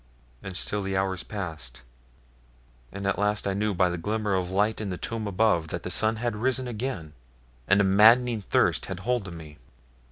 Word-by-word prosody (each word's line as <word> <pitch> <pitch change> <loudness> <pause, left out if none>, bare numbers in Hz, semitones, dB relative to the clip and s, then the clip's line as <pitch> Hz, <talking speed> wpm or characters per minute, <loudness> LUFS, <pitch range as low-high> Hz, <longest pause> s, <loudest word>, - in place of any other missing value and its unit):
And 95 -2 -5
still 105 +3 +1
the 95 -1 -2
hours 95 -1 -1
passed, 80 - -6 1.1
and 100 0 -6
at 100 - 0
last 105 +1 +1
I 100 - 0
knew 105 0 -1
by 90 +1 +3
the 85 0 -3
glimmer 105 +2 -1
of 90 -2 0
light 105 +4 0
in 105 - -3
the 90 - -4
tomb 110 +2 -4
above 95 -5 +2
that - - -5
the 90 - -3
sun 110 +4 +3
had 115 0 -2
risen 130 +2 0
again, 110 - -4 0.5
and 100 +1 +4
a - - +5
maddening 110 +4 +5
thirst - - +1
had 95 0 -6
hold 120 -1 -1
of 85 - -8
me. 75 -4 -11
100 Hz, 195 wpm, -26 LUFS, 90-110 Hz, 1.1 s, a